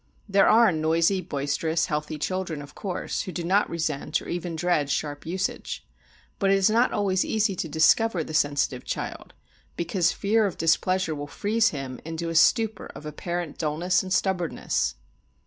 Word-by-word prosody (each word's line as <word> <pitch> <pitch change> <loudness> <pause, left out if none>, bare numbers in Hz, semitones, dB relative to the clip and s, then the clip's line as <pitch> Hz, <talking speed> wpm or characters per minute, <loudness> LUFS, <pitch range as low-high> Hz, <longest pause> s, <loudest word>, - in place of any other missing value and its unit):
There 195 -1 +4
are 225 -1 +6
noisy, 165 +4 +2
boisterous, 160 +1 -1
healthy 150 -1 -3
children, 180 0 -3
of 145 +1 -13
course, 185 +1 -3
who 185 - -5
do 175 - -4
not 195 +4 +2
resent 155 -2 -1
or - - -11
even 175 -1 -3
dread 160 -4 +1
sharp 145 +1 -3
usage. 185 +3 -3 0.5
But 195 - +2
it 195 - +5
is 195 +2 +3
not 235 +3 +3
always 190 -2 +1
easy 215 -3 0
to 165 - -3
discover 165 +5 +3
the 155 - -8
sensitive 145 -4 +1
child, - - -5 0.4
because 175 0 +1
fear 215 +1 +2
of 190 - -6
displeasure 175 +1 +1
will 145 -1 -5
freeze 220 +7 +1
him 135 -3 -6
into 165 +1 -4
a 165 - -4
stupor 220 +6 +3
of 150 - -10
apparent 170 +2 -4
dullness 170 +4 +1
and 185 - -7
stubbornness. 180 -2 0
170 Hz, 165 wpm, -26 LUFS, 155-195 Hz, 0.5 s, are